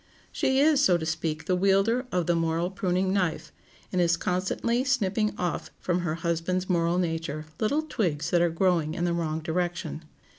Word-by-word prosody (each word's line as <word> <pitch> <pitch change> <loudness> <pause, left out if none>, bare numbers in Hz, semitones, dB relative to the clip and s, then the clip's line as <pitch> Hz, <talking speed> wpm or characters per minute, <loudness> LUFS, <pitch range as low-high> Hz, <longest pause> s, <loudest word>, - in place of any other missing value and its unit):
She 265 0 +1
is, 295 -1 +4
so 180 -9 +5
to 160 - -4
speak, 160 -1 -2
the 185 - +1
wielder 195 +7 +2
of 180 -2 0
the 175 - +2
moral 165 +1 0
pruning 185 0 0
knife, 180 -5 -1 0.4
and 185 - +1
is 170 -1 +3
constantly 190 +8 0
snipping 215 -5 +1
off 180 -1 -2
from 180 0 0
her 170 -3 -2
husband's 170 +2 -1
moral 170 -1 +1
nature 165 -3 -2
little 285 +9 +1
twigs 165 - -2
that 175 - +4
are 175 - +3
growing 165 -2 +1
in 175 -1 -1
the 175 - +1
wrong 160 -2 -2
direction. 170 0 -2
175 Hz, 180 wpm, -27 LUFS, 165-190 Hz, 0.4 s, so